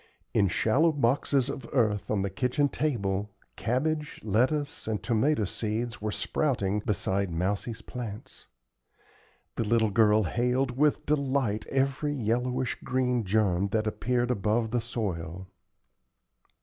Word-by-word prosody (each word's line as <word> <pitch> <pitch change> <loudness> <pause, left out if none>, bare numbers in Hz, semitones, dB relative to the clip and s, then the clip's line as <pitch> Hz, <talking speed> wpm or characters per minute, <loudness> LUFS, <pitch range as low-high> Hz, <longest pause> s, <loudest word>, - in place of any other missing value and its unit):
In 100 - +4
shallow 130 - +3
boxes 135 -1 +1
of 135 -3 -6
earth 105 -5 +1
on 100 -2 +1
the 100 - -1
kitchen 125 +7 +1
table, 105 -10 -1 0.3
cabbage, 150 +6 -1
lettuce, 140 - 0
and 110 -2 -2
tomato 120 0 +2
seeds 110 +4 -3
were 105 0 -1
sprouting 105 -7 0
beside 100 -2 -1
Mousie's 100 +6 -2
plants. 110 -4 -8 1.1
The - - +1
little 110 0 +2
girl 105 0 +4
hailed 125 +6 0
with 150 +2 +2
delight 135 -7 0
every 135 +2 0
yellowish 125 +1 -1
green 125 -3 0
germ 100 -2 +2
that 110 +2 0
appeared 120 +3 0
above 110 +1 0
the 120 -1 +1
soil. 95 -7 -4
115 Hz, 125 wpm, -28 LUFS, 105-130 Hz, 1.1 s, In